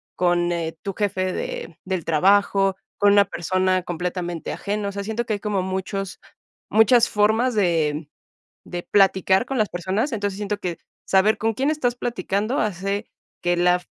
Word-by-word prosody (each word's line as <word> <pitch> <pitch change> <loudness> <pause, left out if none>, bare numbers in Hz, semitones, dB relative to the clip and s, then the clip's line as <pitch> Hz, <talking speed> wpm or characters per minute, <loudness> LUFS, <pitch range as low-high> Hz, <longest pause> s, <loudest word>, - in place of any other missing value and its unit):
con 175 -1 +2
eh 165 -1 -3
tu 195 - -3
jefe 185 -2 -1
de 170 - -5
del 185 -3 -2
trabajo, 195 +3 +3 0.2
con 205 0 +5
una 200 0 +6
persona 185 +1 0
completamente 175 -1 -4
ajeno. 205 0 -3
O - - -5
sea, 200 0 -5
siento 220 +3 -2
que 220 - -1
hay 205 - -2
como 205 -2 -1
muchos 190 +1 -4 0.5
muchas 225 +2 +5
formas 220 +4 +2
de 160 -6 +1 0.6
de 175 -1 -5
platicar 190 +1 +3
con 270 0 -2
las 215 -2 +2
personas. 190 - -2
Entonces, 205 -3 -2
siento 205 0 -3
que 175 -3 -4 0.3
saber 200 +3 +4
con 225 0 0
quién 275 +6 +1
estás 255 -6 0
platicando 235 -1 -2
hace 200 +1 -2 0.3
que 175 0 +1
la 180 0 +3
195 Hz, 165 wpm, -23 LUFS, 180-210 Hz, 0.6 s, una